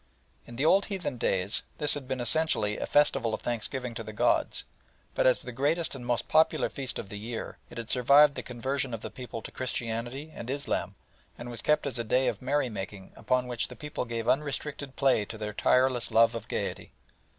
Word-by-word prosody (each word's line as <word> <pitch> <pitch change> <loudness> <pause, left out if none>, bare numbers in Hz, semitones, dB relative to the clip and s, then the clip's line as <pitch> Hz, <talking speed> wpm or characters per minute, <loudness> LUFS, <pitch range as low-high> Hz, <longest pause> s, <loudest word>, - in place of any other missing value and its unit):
In 120 - -9
the 135 +5 0
old 195 +5 +5
heathen 180 - -4
days 95 0 +2 0.2
this 150 -1 +4
had 140 -3 -3
been 130 -1 -2
essentially 120 -5 +2
a - - -3
festival 135 -6 +3
of - - -10
thanksgiving 120 +1 -3
to 115 - -5
the 110 - -7
gods, - - +2 0.5
but - - +3
as 130 - +3
the 125 - -6
greatest 150 +7 0
and 135 -3 -7
most 120 -1 -1
popular 160 0 +3
feast 135 -2 -4
of 100 - -6
the 105 -1 -6
year 115 +1 -6
it - - -11
had 115 -2 -5
survived 140 +5 +6
the - - -4
conversion 130 +1 -2
of 110 - -9
the - - -6
people 120 -3 -7
to - - -8
Christianity 125 +3 -4
and 120 - -7
Islam 140 +1 -2 0.4
and 120 0 -7
was 115 -1 -2
kept 150 +4 +2
as 130 -4 -2
a - - 0
day 125 +4 +2
of - - -1
merry 135 +1 +1
making 95 -3 -7
upon 125 0 +1
which 120 -2 -1
the - - -10
people 150 -4 -4
gave 115 -1 -4
unrestricted 140 0 -1
play 135 -6 +3
to 110 - -8
their 105 -1 -4
tireless 125 +3 +3
love 115 +1 +5
of 115 - -6
gaiety. - - -4
125 Hz, 210 wpm, -29 LUFS, 115-140 Hz, 0.5 s, survived